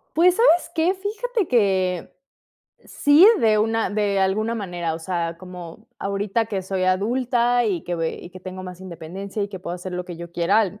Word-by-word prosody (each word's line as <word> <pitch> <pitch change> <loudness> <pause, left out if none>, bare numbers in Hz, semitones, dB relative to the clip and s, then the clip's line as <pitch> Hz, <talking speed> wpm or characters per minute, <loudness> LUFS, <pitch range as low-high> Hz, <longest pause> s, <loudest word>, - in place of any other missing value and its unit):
Pues, 350 +2 +5
¿sabes 355 -8 +4
qué?, 330 +3 +2
fíjate 425 +2 -2
que 190 - +1 0.7
sí, 290 +6 +5
de 215 -1 +4
una 225 +1 +1
de 205 -1 0
alguna 210 +4 +1
manera. 175 -6 -3
O - - -5
sea, 170 -1 -3
como 180 +2 -10
ahorita 200 +3 -1
que 200 -3 -3
soy 185 0 -2
adulta, 240 +5 +2
y 190 -7 -1
que 175 - -3
ve 165 -1 -2
y - - -10
que 185 - -11
tengo 185 0 -7
más 180 -1 -9
independencia, 190 +3 -6
y 200 - -2
que 195 -2 -7
puedo 175 -1 -5
hacer 180 +1 -7
lo 180 0 -3
que 175 -2 -8
yo 170 0 -9
quiera 175 +5 +3
al 205 0 -2
195 Hz, 195 wpm, -23 LUFS, 180-230 Hz, 0.7 s, Pues